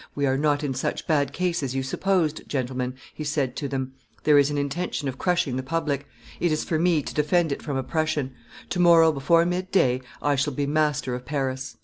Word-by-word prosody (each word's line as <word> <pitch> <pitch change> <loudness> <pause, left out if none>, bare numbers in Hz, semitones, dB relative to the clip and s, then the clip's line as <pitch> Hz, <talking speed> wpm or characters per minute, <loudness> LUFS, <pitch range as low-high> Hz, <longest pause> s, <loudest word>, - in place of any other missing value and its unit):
"We 140 - 0
are 130 -1 +2
not 145 +1 +1
in 140 -2 -1
such 130 - -3
bad 145 -4 +1
case 175 +1 -1
as 135 -2 -3
you 135 - 0
supposed, 165 +2 0
gentlemen," 130 -1 -2 0.2
he 155 - -6
said 145 -4 -1
to 145 - -2
them; 130 -1 -3 0.3
"there 150 -1 +6
is 140 0 +3
an 145 - -2
intention 145 +1 -2
of 130 -1 -5
crushing 170 -8 +1
the - - -1
public; 145 -1 -2 0.3
it 175 - +1
is 155 - 0
for 160 - -1
me 165 -3 +2
to - - -6
defend 155 +2 +2
it 140 - -3
from 140 -3 -3
oppression; 145 -1 -1 0.4
to 180 - -1
morrow 165 -2 +6
before 160 +4 +3
midday 180 -8 +1 0.2
I 145 -1 +1
shall 145 +1 0
be 145 +2 -1
master 150 -3 0
of 125 0 -4
Paris." 130 -1 -3
145 Hz, 215 wpm, -25 LUFS, 135-160 Hz, 0.4 s, there